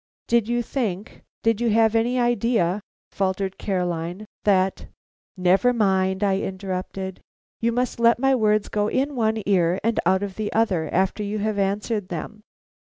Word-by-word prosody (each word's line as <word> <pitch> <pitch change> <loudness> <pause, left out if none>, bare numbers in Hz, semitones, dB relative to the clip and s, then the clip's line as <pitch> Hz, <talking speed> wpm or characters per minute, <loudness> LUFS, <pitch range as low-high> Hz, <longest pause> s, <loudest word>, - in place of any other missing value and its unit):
"Did 235 -2 +2
you 240 0 0
think 215 -5 -4 0.2
did 225 0 +2
you 240 - +2
have 220 0 +3
any 240 +3 +1
idea 230 -5 +1
" - - -88
faltered 190 0 -2
Caroline, 180 0 -2 0.2
"that 190 -2 +2 0.2
" - - -49
"Never 190 +7 +3
mind," 190 -3 +1
I 195 -1 +2
interrupted. 190 -1 -5 0.4
"You 230 +1 +1
must 245 0 -1
let 235 0 +5
my 270 +2 +2
words 215 -4 +2
go 210 0 0
in 275 +5 -1
one 220 -2 0
ear 180 -2 +2
and 230 +1 +1
out 190 +1 +3
of 195 -2 -5
the 215 -1 -2
other 190 -8 +1
after 190 +3 +1
you 205 +1 -2
have 210 0 -1
answered 200 +1 -1
them. 205 +5 -6
205 Hz, 170 wpm, -23 LUFS, 190-230 Hz, 0.4 s, let